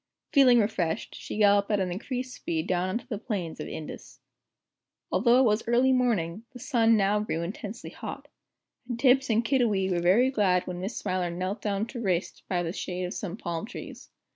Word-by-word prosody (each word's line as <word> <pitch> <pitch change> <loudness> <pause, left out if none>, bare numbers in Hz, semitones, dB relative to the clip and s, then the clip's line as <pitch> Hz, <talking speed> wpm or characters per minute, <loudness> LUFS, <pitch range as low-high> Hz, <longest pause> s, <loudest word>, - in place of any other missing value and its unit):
Feeling 265 -4 +7
refreshed, 200 -7 0
she - - -7
galloped 205 -1 +4
at 210 -2 +2
an 185 -2 -1
increased 255 +7 -4
speed 160 -1 -3
down 185 0 0
on 185 - 0
to - - -10
the 215 - -4
plains 195 -8 -4
of - - -5
Indus. 155 - -8 0.9
Although 240 0 +4
it 260 - +5
was 215 -2 +3
early 250 +3 +4
morning, 220 -7 0
the 250 - -10
sun 230 -3 +3
now 205 +1 +2
grew 170 -6 -2
intensely 205 +5 -6
hot. - - -8 0.6
And 240 -1 -3
Tibbs 265 +1 +4
and 225 +1 +2
Kiddiwee 220 -7 +2
were 175 -1 +1
very 220 +10 +4
glad 190 -7 +2
when 180 -1 -5
Miss 200 +5 -4
Smiler 185 -1 -1
knelt 185 +4 -3
down 205 0 -1
to 235 +1 -7
rest 185 -4 -1
beneath 175 -2 0
the 165 - -3
shade 180 -1 -4
of 180 - -3
some 195 -1 -5
tall 170 -6 -3
palm 210 - -7
trees. - - -9
205 Hz, 200 wpm, -27 LUFS, 180-235 Hz, 0.9 s, Feeling